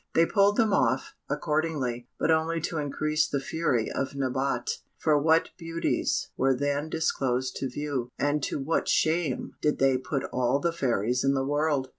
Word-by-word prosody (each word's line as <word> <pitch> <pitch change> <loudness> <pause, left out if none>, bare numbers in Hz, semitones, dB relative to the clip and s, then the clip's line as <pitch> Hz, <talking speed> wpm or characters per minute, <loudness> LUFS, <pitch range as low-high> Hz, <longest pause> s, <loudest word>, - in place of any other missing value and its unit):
They 165 - +6
pulled 200 +2 +3
them 220 -3 +3
off, 130 -5 +1 0.2
accordingly, 150 -6 -1
but - - +1
only 160 +1 +1
to 160 0 -2
increase 150 +2 0
the 140 - -1
fury 135 -6 -1
of 135 +1 -3
Nabote, 130 -2 -1 0.2
for 150 -2 +2
what 160 +2 +3
beauties 165 0 -1
were 135 0 +2
then 145 +3 -1
disclosed 130 -5 -1
to 135 - -2
view, 135 -2 -3
and 145 +1 +1
to - - -2
what 145 +4 -1
shame 155 -5 +1
did 150 - +1
they 135 -1 +3
put 135 +1 -3
all 125 +2 +2
the 170 +3 0
fairies 125 -5 0
in 135 0 +2
the 135 0 0
world! 145 -2 0
145 Hz, 170 wpm, -27 LUFS, 130-160 Hz, 0.2 s, They